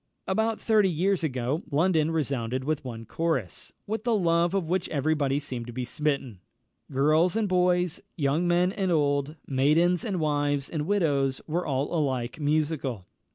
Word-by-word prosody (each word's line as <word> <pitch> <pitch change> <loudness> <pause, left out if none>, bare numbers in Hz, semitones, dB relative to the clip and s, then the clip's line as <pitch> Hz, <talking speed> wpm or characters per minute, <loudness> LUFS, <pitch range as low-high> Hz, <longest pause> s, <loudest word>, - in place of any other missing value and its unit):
About 220 0 0
thirty 215 -4 +3
years 180 +2 +1
ago 130 +1 -1
London 160 +1 +2
resounded 130 -5 -1
with 155 +1 -1
one 115 -3 -7
chorus, 135 - -2
with 220 +1 -3
the 235 -2 +2
love 170 -1 +2
of 185 -5 0
which 180 +1 -1
every 155 +1 +1
body 140 -2 0
seemed 125 -5 -6
to - - -6
be 125 +1 -4
smitten. 135 -6 -2 0.5
Girls 155 +7 +3
and 220 -2 +1
boys, 180 -2 +1
young 150 +2 +1
men 175 +1 +3
and 190 -2 -1
old, 145 -1 +1
maidens 155 +6 +2
and 195 -6 -2
wives 145 -2 0
and 155 -2 -2
widows, 145 -9 +1
were 170 +3 -2
all 140 +2 -1
alike 130 -5 -1
musical. 145 - -1
155 Hz, 160 wpm, -27 LUFS, 135-175 Hz, 0.5 s, thirty